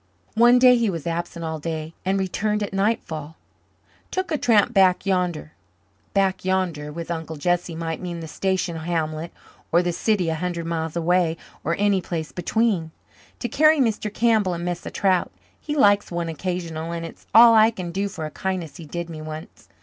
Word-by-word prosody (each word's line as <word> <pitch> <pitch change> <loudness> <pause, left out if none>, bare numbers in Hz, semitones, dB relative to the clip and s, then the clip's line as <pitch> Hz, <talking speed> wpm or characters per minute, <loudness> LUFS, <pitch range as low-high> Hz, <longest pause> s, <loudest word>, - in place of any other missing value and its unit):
One 240 +2 +6
day 250 0 +7
he 230 -2 +1
was 165 -5 -4
absent 170 0 -3
all 160 -1 -3
day 160 0 -4
and 190 +1 +1
returned 210 +3 -1
at 200 - -5
nightfall. 165 -7 -1 0.7
"Took 375 -2 -3
a 310 - +1
tramp 230 0 +3
back 190 -3 +4
yander." 180 -5 -1 0.6
"Back 195 -1 +1
yander" 180 -6 -1
with 170 +2 -6
Uncle 160 -1 -4
Jesse 175 +2 -1
might 165 -1 -4
mean 175 -2 -5
the 165 - -7
station 185 0 -1
hamlet 160 0 -2 0.4
or 170 +2 +4
the 175 - 0
city 185 -1 +1
a - - 0
hundred 170 +1 -3
miles 165 -1 -3
away 170 -1 +2 0.3
or 170 - 0
any 200 -2 +2
place 165 -3 -4
between 185 -2 0 0.5
"to - - -3
carry 310 +4 +4
Mr. 220 -5 0
Kimball 215 -5 +2
a - - -4
mess 175 +1 -4
of - - -7
trout. 190 -2 +1 0.3
He 295 - -4
likes 205 -7 +4
one 170 -1 -3
occasional 165 -1 -4
and 165 0 -4
it's 165 - -12
all 230 0 +9
I 220 0 +7
can 185 -6 -6
do 195 +3 -1
for 160 -5 -6
a 155 - -6
kindness 185 -5 -4
he 165 - -9
did 170 +2 -4
me 160 -2 -8
once. 155 0 -9
175 Hz, 190 wpm, -23 LUFS, 165-200 Hz, 0.7 s, all